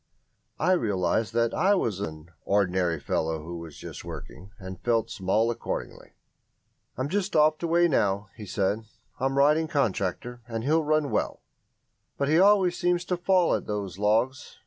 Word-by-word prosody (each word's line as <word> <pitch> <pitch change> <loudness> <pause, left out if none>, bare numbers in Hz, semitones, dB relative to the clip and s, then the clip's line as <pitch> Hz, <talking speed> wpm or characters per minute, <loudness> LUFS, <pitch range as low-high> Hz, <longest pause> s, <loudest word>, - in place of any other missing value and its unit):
I 185 - +2
realised 105 - +1
that 115 -1 +2
I 200 +2 +3
was 110 - -1
an 80 -3 -6
"ordinary 90 -4 +1
fellow 80 +2 -2
who 85 +1 -6
was 80 -3 -10
just - - -9
working", 95 +5 -9
and 95 -2 -9
felt 115 -2 0
small 105 +5 +1
accordingly. 120 - -6 0.8
"I'm 130 +2 -1
just 195 +3 -2
off 155 0 +4
to 170 - -2
weigh 170 +1 +4
now," 100 - 0
he 105 -3 -9
said 100 +3 -1 0.3
"I'm 135 +1 0
riding 150 +3 +4
Contractor, 120 - -1
and 115 -1 -4
he'll 155 +4 +2
run 155 -1 +1
well, - - -2 0.7
but 140 0 0
he 160 +2 +4
always 190 -2 +5
seems 175 0 +1
to 180 - 0
fall 180 0 +2
at - - -2
those 100 -3 -4
logs. 115 +6 0
115 Hz, 165 wpm, -27 LUFS, 95-155 Hz, 0.8 s, always